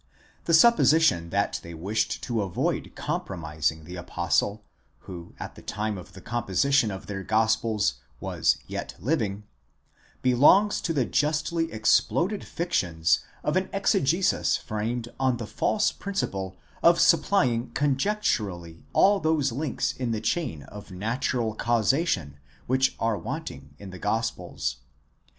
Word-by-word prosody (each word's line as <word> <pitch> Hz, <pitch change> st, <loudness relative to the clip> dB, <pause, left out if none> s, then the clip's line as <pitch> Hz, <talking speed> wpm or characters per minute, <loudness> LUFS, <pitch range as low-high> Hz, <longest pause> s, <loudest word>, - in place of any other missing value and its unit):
The 165 Hz, -, +4 dB
supposition 160 Hz, -, +5 dB
that 100 Hz, +3 st, 0 dB
they 85 Hz, 0 st, -9 dB
wished 100 Hz, +7 st, -2 dB
to 115 Hz, -3 st, -1 dB
avoid 95 Hz, -3 st, -2 dB
com -, -, -2 dB
promising 80 Hz, -3 st, -3 dB
the 90 Hz, +3 st, -8 dB
apostle, 90 Hz, +4 st, -1 dB, 0.4 s
who 85 Hz, -2 st, -10 dB
at -, -, -6 dB
the -, -, -13 dB
time 105 Hz, 0 st, -3 dB
of 90 Hz, -, -10 dB
the 95 Hz, -, -11 dB
composition 120 Hz, +3 st, +1 dB
of 95 Hz, -2 st, -6 dB
their 95 Hz, -1 st, -5 dB
gospels 110 Hz, 0 st, +1 dB, 0.2 s
was -, -, +1 dB
yet -, -, -6 dB
living,' 105 Hz, -, -1 dB, 0.8 s
belongs 150 Hz, +12 st, +5 dB
to 170 Hz, -, -1 dB
the 135 Hz, -5 st, +1 dB
justly 155 Hz, +4 st, 0 dB
exploded 130 Hz, -, +2 dB
fictions 80 Hz, -, 0 dB, 0.2 s
of -, -, 0 dB
an -, -, 0 dB
exegesis -, -, +2 dB
framed 115 Hz, +3 st, -3 dB
on 130 Hz, -2 st, +2 dB
the 115 Hz, -, -5 dB
false 210 Hz, -, +1 dB
principle 95 Hz, -, -4 dB, 0.2 s
of 170 Hz, 0 st, +5 dB
supplying 130 Hz, -10 st, +3 dB
conjecturally 125 Hz, -, -1 dB
all 200 Hz, +1 st, +5 dB
those 155 Hz, -6 st, +1 dB
links 140 Hz, +3 st, -1 dB
in 125 Hz, -2 st, -3 dB
the 110 Hz, -2 st, -1 dB
chain 115 Hz, -, -2 dB
of 105 Hz, 0 st, -11 dB
natural 110 Hz, +4 st, -1 dB
causation 110 Hz, -, 0 dB, 0.3 s
which 130 Hz, +1 st, +2 dB
are 115 Hz, -3 st, 0 dB
wanting -, -, -7 dB
in 100 Hz, -2 st, -10 dB
the 95 Hz, -, -9 dB
gospels. 105 Hz, -, -2 dB
115 Hz, 130 wpm, -26 LUFS, 95-145 Hz, 0.8 s, supposition